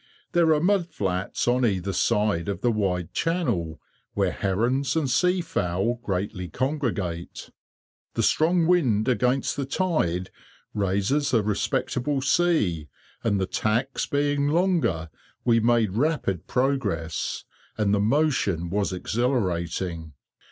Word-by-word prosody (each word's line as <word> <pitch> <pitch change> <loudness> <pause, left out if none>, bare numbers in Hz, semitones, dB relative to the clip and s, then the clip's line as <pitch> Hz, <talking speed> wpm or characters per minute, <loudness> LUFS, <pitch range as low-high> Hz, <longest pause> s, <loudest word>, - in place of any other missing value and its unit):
There 170 -2 +4
are - - +1
mud 180 +1 +2
flats 95 - -2
on 125 +1 +2
either 100 -4 0
side 105 -4 +1
of 100 -2 -3
the 120 - +2
wide 90 -6 -1
channel, 120 - -1 0.4
where - - +1
herons 125 - 0
and 160 -4 +1
sea 180 +8 +2
fowl 100 - -1
greatly 95 -3 -3
congregate. 115 - -3 0.6
The - - +1
strong 165 +2 +3
wind 130 -12 +2
against 125 +2 +1
the 140 - -1
tide 135 - 0 0.4
raises 105 +8 +1
a 110 - +3
respectable 120 +6 -1
sea, 130 - +1 0.4
and 100 -4 +1
the 95 - +1
tacks 115 +8 -1
being 145 0 +1
longer 155 - +1 0.3
we 115 -2 +4
made 115 -3 +2
rapid 120 - -1
progress, 125 - -1 0.3
and 105 -2 +1
the 105 - +3
motion 105 - +1
was 100 0 0
exhilarating. 90 - -2
115 Hz, 125 wpm, -25 LUFS, 95-145 Hz, 0.6 s, There